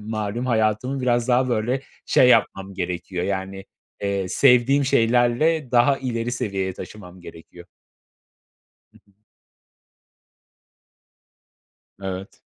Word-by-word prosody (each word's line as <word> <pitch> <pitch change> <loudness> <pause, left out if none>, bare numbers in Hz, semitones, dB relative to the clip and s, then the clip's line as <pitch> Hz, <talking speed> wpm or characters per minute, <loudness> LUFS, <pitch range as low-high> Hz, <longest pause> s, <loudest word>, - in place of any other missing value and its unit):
malum 110 +3 -4
hayatımı 110 +3 0
biraz 120 -1 0
daha, 125 +1 +2
böyle, 120 +3 -1 0.3
şey 125 - +4
yapmam 100 -5 +2
gerekiyor, 90 0 -4
yani, 95 0 -4 0.4
eee, 100 -2 -2
sevdiğim 135 +4 +4
şeylerle 125 +4 +2
daha 125 +3 +3
ileri 120 -2 -3
seviyeye 100 -7 -2
taşımam 90 -2 -11
gerekiyor. 85 +1 -13 1.3
Hı - - -21
hı. 100 - -29 2.9
Evet. 95 0 -7
115 Hz, 95 wpm, -22 LUFS, 95-125 Hz, 2.9 s, şey